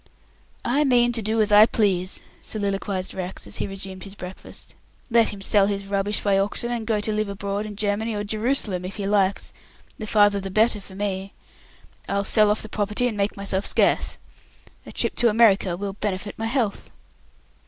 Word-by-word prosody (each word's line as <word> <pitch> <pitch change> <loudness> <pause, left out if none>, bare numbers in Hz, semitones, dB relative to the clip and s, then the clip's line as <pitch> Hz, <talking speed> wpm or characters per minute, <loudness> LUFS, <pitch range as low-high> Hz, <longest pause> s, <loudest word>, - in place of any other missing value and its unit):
"I 275 +5 +2
mean 240 -3 +3
to 230 -1 0
do 220 +2 -1
as 210 - +1
I 210 +1 +8
please," 190 -5 0 0.2
soliloquized 200 -2 -1
Rex, 185 0 -4
as - - -3
he - - -2
resumed 190 -1 -7
his 195 0 -8
breakfast. 180 -1 -10 0.4
"Let 230 -1 +4
him 200 - -9
sell 195 0 +4
his 200 -1 -3
rubbish 200 +1 -1
by 195 -1 +2
auction, 205 +4 -1
and 230 -2 -4
go 225 - +2
and 210 0 -1
live 215 -1 -1
abroad, 200 +1 -4
in 210 - -8
Germany 210 +2 -1
or 205 - -2
Jerusalem 215 -3 0
if 185 +2 -6
he 205 - -4
likes, 200 -1 0 0.5
the 215 - -5
farther 205 -1 +4
the 195 0 -5
better 215 +2 +2
for 190 -1 -13
me. 195 -1 -3 0.8
I'll 200 - 0
sell 210 0 +4
the 220 - -6
property 210 +3 0
and 230 - -3
make 200 0 -1
myself 200 -1 -1
scarce. - - +2 0.7
A - - -8
trip - - -1
to 240 - +4
America 205 -5 +3
will 200 0 -4
benefit 205 0 -4
my 225 - -3
health." 230 -4 -2
205 Hz, 185 wpm, -23 LUFS, 195-215 Hz, 0.8 s, I